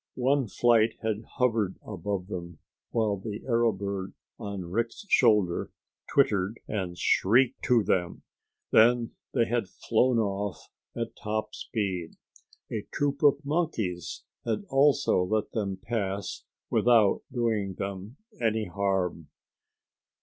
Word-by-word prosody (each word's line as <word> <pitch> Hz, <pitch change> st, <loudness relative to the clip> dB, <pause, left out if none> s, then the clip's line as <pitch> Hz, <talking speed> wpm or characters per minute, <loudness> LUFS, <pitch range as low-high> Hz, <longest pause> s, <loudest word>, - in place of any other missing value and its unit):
One 130 Hz, 0 st, +2 dB
flight 115 Hz, +1 st, +3 dB
had 110 Hz, 0 st, -1 dB
hovered 115 Hz, -6 st, +1 dB
above 100 Hz, -3 st, -3 dB
them 85 Hz, -4 st, -7 dB, 0.3 s
while 110 Hz, -3 st, +1 dB
the 105 Hz, +2 st, -6 dB
arrow 115 Hz, -2 st, +3 dB
bird 100 Hz, -1 st, -4 dB, 0.2 s
on 100 Hz, -3 st, -5 dB
Rick's 115 Hz, -, -2 dB
shoulder 105 Hz, -, +3 dB, 0.4 s
twittered 105 Hz, -6 st, +2 dB
and 95 Hz, -4 st, -3 dB
shrieked 120 Hz, +8 st, +3 dB
to 120 Hz, -4 st, +4 dB
them. 90 Hz, -3 st, -1 dB, 0.5 s
Then 120 Hz, +1 st, +5 dB, 0.2 s
they 120 Hz, -3 st, +4 dB
had 115 Hz, -3 st, -1 dB
flown 120 Hz, +2 st, +1 dB
off 100 Hz, -2 st, -2 dB, 0.2 s
at -, -, -4 dB
top 110 Hz, 0 st, -3 dB
speed. 95 Hz, -7 st, -3 dB, 0.6 s
A 110 Hz, -, -2 dB
troop 140 Hz, -1 st, -1 dB
of 145 Hz, 0 st, +4 dB
monkeys 115 Hz, -, -2 dB, 0.2 s
had 115 Hz, -, -2 dB
also 140 Hz, -6 st, +4 dB
let 110 Hz, +3 st, -1 dB
them 100 Hz, -4 st, -2 dB
pass 100 Hz, -5 st, -3 dB, 0.3 s
without 115 Hz, -5 st, +4 dB
doing 110 Hz, -6 st, 0 dB
them 100 Hz, +5 st, -6 dB, 0.2 s
any 110 Hz, -1 st, +1 dB
harm. 90 Hz, -3 st, -1 dB
110 Hz, 120 wpm, -28 LUFS, 95-120 Hz, 0.6 s, Then